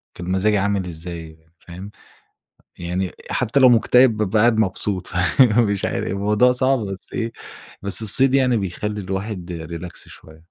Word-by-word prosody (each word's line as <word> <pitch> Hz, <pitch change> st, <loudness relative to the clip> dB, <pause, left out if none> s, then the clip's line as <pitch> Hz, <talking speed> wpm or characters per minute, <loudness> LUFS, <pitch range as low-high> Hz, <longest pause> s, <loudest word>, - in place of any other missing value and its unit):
كان 90 Hz, +1 st, -6 dB
مزاجي 105 Hz, +3 st, +2 dB
عامل 100 Hz, -1 st, 0 dB
إزاي، 80 Hz, -1 st, -8 dB, 0.2 s
فاهم؟ 90 Hz, +4 st, -11 dB, 0.9 s
يعني 90 Hz, +2 st, -3 dB, 0.2 s
حتى 130 Hz, +6 st, 0 dB
لو 130 Hz, -2 st, +7 dB
مُكتئِب 120 Hz, 0 st, +4 dB
بابقى 105 Hz, 0 st, 0 dB
قاعد 115 Hz, 0 st, +3 dB
مبسوط، 95 Hz, -2 st, -1 dB
فمش 100 Hz, +3 st, +2 dB
عارف. -, -, -3 dB
الموضوع 105 Hz, +6 st, +2 dB
صعب، 130 Hz, +1 st, +1 dB
بس 95 Hz, -3 st, -7 dB
إيه، 115 Hz, -1 st, -3 dB, 0.5 s
بس 100 Hz, +1 st, 0 dB
الصيد 130 Hz, +5 st, +4 dB
يعني 130 Hz, -3 st, +3 dB
بيخلّي 105 Hz, +2 st, -4 dB
الواحد 90 Hz, -4 st, -5 dB, 0.2 s
relax 90 Hz, -, -9 dB
شوية. 80 Hz, 0 st, -15 dB
100 Hz, 145 wpm, -21 LUFS, 90-115 Hz, 0.9 s, لو